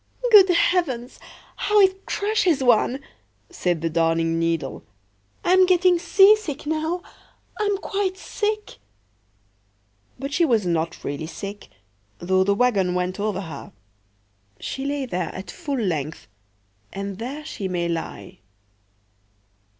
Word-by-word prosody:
"Good 395 Hz, -3 st, +9 dB
heavens, 315 Hz, -8 st, +1 dB, 0.4 s
how 420 Hz, 0 st, +2 dB
it 385 Hz, -1 st, +3 dB
crushes 400 Hz, -9 st, +1 dB
one!" 245 Hz, +2 st, +3 dB, 0.5 s
said 175 Hz, -3 st, -1 dB
the 165 Hz, -, 0 dB
Darning 165 Hz, 0 st, +1 dB
needle. 165 Hz, -4 st, -2 dB, 0.6 s
"I'm 370 Hz, +1 st, +5 dB
getting 360 Hz, -1 st, +4 dB
seasick 385 Hz, -3 st, +4 dB
now,—I'm 350 Hz, +5 st, -4 dB
quite 390 Hz, -1 st, -2 dB
sick."But 100 Hz, -, -8 dB
she 340 Hz, -, +3 dB
was 230 Hz, -, +2 dB
not 170 Hz, -1 st, -2 dB
really 145 Hz, +2 st, -4 dB
sick, 200 Hz, +4 st, -8 dB, 0.5 s
though 185 Hz, +2 st, +2 dB
the 200 Hz, +1 st, +2 dB
wagon 200 Hz, -6 st, +2 dB
went 180 Hz, +2 st, -2 dB
over 205 Hz, -2 st, -1 dB
her; 160 Hz, -7 st, -9 dB, 0.9 s
she 270 Hz, -, -5 dB
lay 280 Hz, -1 st, -2 dB
there 180 Hz, -8 st, -3 dB
at 190 Hz, -, -7 dB
full 290 Hz, -6 st, -4 dB
length, 160 Hz, -, -3 dB, 0.6 s
and 195 Hz, 0 st, -5 dB
there 275 Hz, +6 st, -6 dB
she 200 Hz, -9 st, -4 dB
may 175 Hz, -2 st, -1 dB
lie. 170 Hz, +2 st, -5 dB
210 Hz, 115 wpm, -23 LUFS, -, 0.9 s, Good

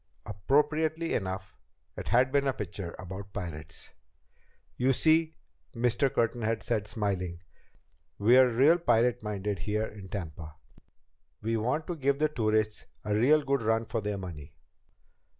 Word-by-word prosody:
Appropriately 150 Hz, -, +1 dB
enough, 95 Hz, -1 st, -3 dB, 0.4 s
it -, -, -7 dB
had 125 Hz, +3 st, +3 dB
been 140 Hz, 0 st, +2 dB
a 135 Hz, -, +2 dB
picture 95 Hz, -4 st, -6 dB
about 95 Hz, +2 st, -8 dB
pirates. 85 Hz, -6 st, -7 dB, 0.8 s
"You 130 Hz, +2 st, +2 dB
see," 160 Hz, +3 st, +3 dB, 0.4 s
Mr. 120 Hz, +3 st, +2 dB
Curtin 115 Hz, +1 st, 0 dB
had 110 Hz, 0 st, -1 dB
said, 110 Hz, -3 st, -1 dB
smiling, 95 Hz, -5 st, -3 dB, 0.7 s
"we're 125 Hz, +5 st, +6 dB
real 140 Hz, +9 st, +4 dB
pirate 125 Hz, -5 st, +2 dB
minded 105 Hz, -2 st, -3 dB
here 105 Hz, +3 st, -1 dB
in 100 Hz, -3 st, -10 dB
Tampa. 80 Hz, -5 st, -6 dB, 0.8 s
We 115 Hz, +2 st, -1 dB
want 125 Hz, +8 st, 0 dB
to 175 Hz, -, -4 dB
give 140 Hz, -2 st, +1 dB
the 155 Hz, +1 st, +2 dB
tourists 110 Hz, -5 st, 0 dB, 0.2 s
a 105 Hz, -, 0 dB
real 140 Hz, +8 st, +4 dB
good 140 Hz, -1 st, 0 dB
run 115 Hz, +1 st, +1 dB
for 115 Hz, 0 st, -2 dB
their 105 Hz, -1 st, -2 dB
money." 85 Hz, -6 st, -8 dB
110 Hz, 140 wpm, -29 LUFS, 100-135 Hz, 0.8 s, we're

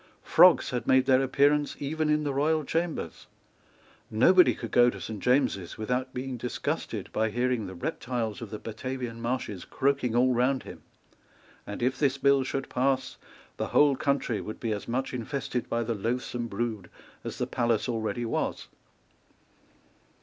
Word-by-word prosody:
Frogs -, -, +6 dB
had 125 Hz, -1 st, -3 dB
made 130 Hz, 0 st, +5 dB
their 130 Hz, -1 st, +4 dB
appearance 145 Hz, +2 st, +2 dB
even 155 Hz, +2 st, -1 dB
in 150 Hz, 0 st, +2 dB
the 145 Hz, -2 st, -1 dB
royal 155 Hz, +3 st, +1 dB
chambers. 165 Hz, +3 st, -3 dB, 0.8 s
Nobody 180 Hz, +12 st, +5 dB
could -, -, -7 dB
go 120 Hz, 0 st, +6 dB
to -, -, -7 dB
Saint 110 Hz, -2 st, -6 dB
James's 125 Hz, -6 st, +1 dB
without 125 Hz, +4 st, -2 dB
being 130 Hz, 0 st, -5 dB
disgusted 120 Hz, +1 st, -4 dB
by 110 Hz, +1 st, +1 dB
hearing 120 Hz, -1 st, -1 dB
the 95 Hz, -, -8 dB
reptiles 120 Hz, -, -3 dB
of 115 Hz, -, -6 dB
the 105 Hz, -, -5 dB
Batavian 115 Hz, +1 st, -5 dB
marshes 115 Hz, -6 st, -3 dB
croaking 130 Hz, -4 st, 0 dB
all 125 Hz, +1 st, +4 dB
round 125 Hz, +2 st, +1 dB
him; -, -, -10 dB, 0.9 s
and 105 Hz, +3 st, -5 dB
if 130 Hz, +1 st, 0 dB
this 140 Hz, -2 st, +2 dB
bill 140 Hz, 0 st, +3 dB
should 135 Hz, +1 st, -3 dB
pass, 130 Hz, 0 st, 0 dB, 0.4 s
the -, -, -2 dB
whole 145 Hz, -2 st, +4 dB
country 140 Hz, -5 st, 0 dB
would 110 Hz, -, -7 dB
be 115 Hz, -, -2 dB
as 105 Hz, -1 st, -4 dB
much 130 Hz, +3 st, -2 dB
infested 125 Hz, 0 st, -3 dB
by 115 Hz, 0 st, 0 dB
the 115 Hz, +1 st, -1 dB
loathsome 120 Hz, +2 st, -3 dB
brood 110 Hz, -3 st, -3 dB, 0.3 s
as -, -, -6 dB
the -, -, -1 dB
palace 120 Hz, -2 st, 0 dB
already 120 Hz, 0 st, -2 dB
was. 115 Hz, -, -2 dB
125 Hz, 160 wpm, -28 LUFS, 115-135 Hz, 0.9 s, Frogs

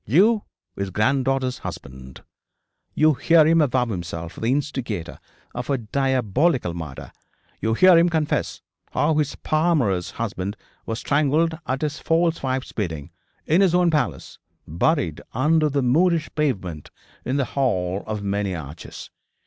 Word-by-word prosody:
You 205 Hz, -, +4 dB, 0.3 s
his 100 Hz, 0 st, -3 dB
granddaughter's 130 Hz, +5 st, 0 dB
husband. 65 Hz, -1 st, -9 dB, 0.7 s
You 155 Hz, 0 st, +4 dB
hear 160 Hz, +3 st, +4 dB
him 165 Hz, +1 st, +4 dB
avow 130 Hz, -4 st, +2 dB
himself 85 Hz, -5 st, -5 dB
the 110 Hz, -, -3 dB
instigator 125 Hz, -, -2 dB, 0.3 s
of 125 Hz, +1 st, -5 dB
a 140 Hz, -, +2 dB
diabolical 130 Hz, -, 0 dB
murder; 80 Hz, -6 st, -7 dB, 0.5 s
you 110 Hz, 0 st, 0 dB
hear 185 Hz, +4 st, +7 dB
him 170 Hz, +1 st, +4 dB
confess 160 Hz, -3 st, -1 dB, 0.3 s
how 155 Hz, +2 st, +2 dB
his 150 Hz, -2 st, 0 dB
paramour's 150 Hz, -, +1 dB
husband 100 Hz, -3 st, -4 dB, 0.3 s
was 115 Hz, -, -2 dB
strangled 150 Hz, +4 st, +1 dB
at 135 Hz, +3 st, -2 dB
his 150 Hz, 0 st, -2 dB
false 165 Hz, 0 st, +1 dB
wife's 130 Hz, -1 st, -2 dB
bidding, 85 Hz, -7 st, -4 dB, 0.3 s
in 165 Hz, +5 st, +3 dB
his 185 Hz, -3 st, +4 dB
own 180 Hz, -1 st, +3 dB
palace, 90 Hz, -, -2 dB, 0.3 s
buried 85 Hz, -, 0 dB
under 155 Hz, +5 st, +2 dB
the 140 Hz, -1 st, 0 dB
Moorish 160 Hz, +5 st, +2 dB
pavement 95 Hz, -, -2 dB, 0.3 s
in 130 Hz, +3 st, -1 dB
the 140 Hz, -, +1 dB
hall 100 Hz, -9 st, -1 dB
of 105 Hz, -1 st, -4 dB
many 100 Hz, -1 st, -1 dB
arches. 75 Hz, 0 st, -9 dB
130 Hz, 140 wpm, -23 LUFS, 100-155 Hz, 0.7 s, hear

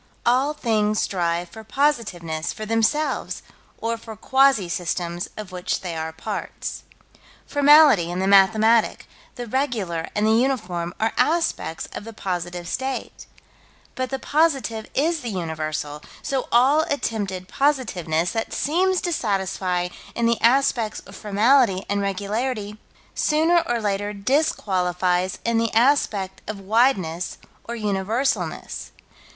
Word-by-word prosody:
All 265 Hz, +5 st, +2 dB
things 215 Hz, -5 st, +1 dB
strive 175 Hz, -2 st, -1 dB
for 220 Hz, +4 st, -11 dB
positiveness, 210 Hz, -, -1 dB
for 215 Hz, -, -6 dB
themselves, 225 Hz, +8 st, 0 dB, 0.3 s
or 230 Hz, +1 st, -2 dB
for 225 Hz, -1 st, -9 dB
quasi 265 Hz, -4 st, +3 dB
systems 175 Hz, 0 st, -3 dB
of 210 Hz, -3 st, -7 dB
which 180 Hz, -1 st, -2 dB
they 175 Hz, -3 st, -5 dB
are 160 Hz, 0 st, -3 dB
parts. 185 Hz, +6 st, -5 dB, 0.6 s
Formality 285 Hz, -, +6 dB
and 180 Hz, -, -3 dB
the 190 Hz, -, 0 dB
mathematic, 215 Hz, +3 st, +4 dB, 0.3 s
the 245 Hz, -, -5 dB
regular 215 Hz, -, -2 dB
and 210 Hz, 0 st, +2 dB
the 220 Hz, -, +4 dB
uniform 190 Hz, -9 st, 0 dB
are 220 Hz, +1 st, +1 dB
aspects 320 Hz, -, 0 dB
of -, -, -6 dB
the 225 Hz, +1 st, -9 dB
positive 175 Hz, -3 st, -4 dB
state 265 Hz, +7 st, -4 dB, 0.7 s
but 255 Hz, -1 st, -3 dB
the 270 Hz, -, -2 dB
Positive 270 Hz, -7 st, 0 dB
is 320 Hz, +4 st, +1 dB
the 240 Hz, -, -4 dB
Universal 155 Hz, -5 st, -4 dB, 0.2 s
so 270 Hz, -2 st, -2 dB
all 265 Hz, +6 st, +5 dB
attempted 200 Hz, -9 st, -2 dB
positiveness 185 Hz, -, 0 dB
that 225 Hz, -1 st, -3 dB
seems 365 Hz, +5 st, +1 dB
to 350 Hz, -2 st, -1 dB
satisfy 190 Hz, -, -1 dB, 0.3 s
in 235 Hz, -, 0 dB
the 230 Hz, 0 st, +1 dB
aspects 235 Hz, -2 st, +2 dB
of -, -, -14 dB
formality 210 Hz, -1 st, +3 dB
and 200 Hz, 0 st, 0 dB
regularity, 210 Hz, +2 st, -2 dB, 0.3 s
sooner 325 Hz, +3 st, +3 dB
or 240 Hz, -1 st, 0 dB
later 205 Hz, -1 st, -1 dB
disqualifies 185 Hz, -, 0 dB
in 230 Hz, -1 st, +2 dB
the 230 Hz, -1 st, 0 dB
aspect 220 Hz, -7 st, +2 dB
of 215 Hz, -2 st, -5 dB
wideness 195 Hz, -5 st, +1 dB, 0.3 s
or 235 Hz, -, -5 dB
universalness. 215 Hz, +4 st, -2 dB
215 Hz, 130 wpm, -23 LUFS, 185-260 Hz, 0.7 s, Formality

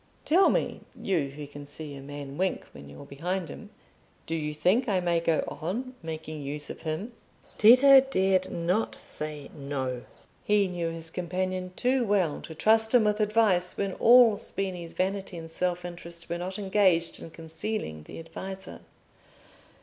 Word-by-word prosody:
Tell 365 Hz, +5 st, +5 dB
me, -, -, -1 dB, 0.2 s
you 165 Hz, -9 st, 0 dB
who 145 Hz, +2 st, -8 dB
can 145 Hz, 0 st, -10 dB
see 145 Hz, 0 st, -7 dB
a 135 Hz, -, -9 dB
man 140 Hz, 0 st, -8 dB
wink 185 Hz, +4 st, -1 dB
when 70 Hz, 0 st, -12 dB
you're 70 Hz, 0 st, -11 dB
behind 175 Hz, +4 st, -3 dB
him, -, -, -9 dB, 0.6 s
do 165 Hz, -, -4 dB
you 150 Hz, -2 st, -2 dB
think 185 Hz, -, +2 dB
I 190 Hz, -2 st, +2 dB
may 175 Hz, -1 st, +1 dB
go 165 Hz, -1 st, +1 dB
on 235 Hz, +11 st, -4 dB
making 155 Hz, -2 st, -6 dB
use 145 Hz, +1 st, -5 dB
of -, -, -10 dB
him?" 165 Hz, +9 st, -4 dB, 0.5 s
Tito 260 Hz, +5 st, +9 dB
dared 190 Hz, -8 st, +1 dB
not 180 Hz, +6 st, 0 dB
say 150 Hz, -2 st, -6 dB
"No." 135 Hz, -4 st, -3 dB, 0.4 s
He 205 Hz, -1 st, +3 dB
knew 175 Hz, -2 st, -2 dB
his 165 Hz, 0 st, -6 dB
companion 185 Hz, +1 st, -3 dB
too 255 Hz, 0 st, +2 dB
well 195 Hz, -8 st, +1 dB
to 160 Hz, -, -9 dB
trust 220 Hz, +6 st, +3 dB
him 240 Hz, -, +6 dB
with 210 Hz, 0 st, +1 dB
advice 210 Hz, -4 st, +2 dB
when 195 Hz, -1 st, -1 dB
all 235 Hz, -1 st, +6 dB
Spini's 180 Hz, -5 st, -5 dB
vanity 190 Hz, -1 st, -2 dB
and 165 Hz, -1 st, -8 dB
self 180 Hz, +1 st, -1 dB
interest 170 Hz, -1 st, -9 dB
were 170 Hz, +1 st, -2 dB
not 185 Hz, +2 st, -4 dB
engaged 190 Hz, -4 st, +2 dB
in -, -, -8 dB
concealing 160 Hz, -, -5 dB
the -, -, -10 dB
adviser. 190 Hz, +4 st, -8 dB
180 Hz, 165 wpm, -28 LUFS, 155-200 Hz, 0.6 s, Tito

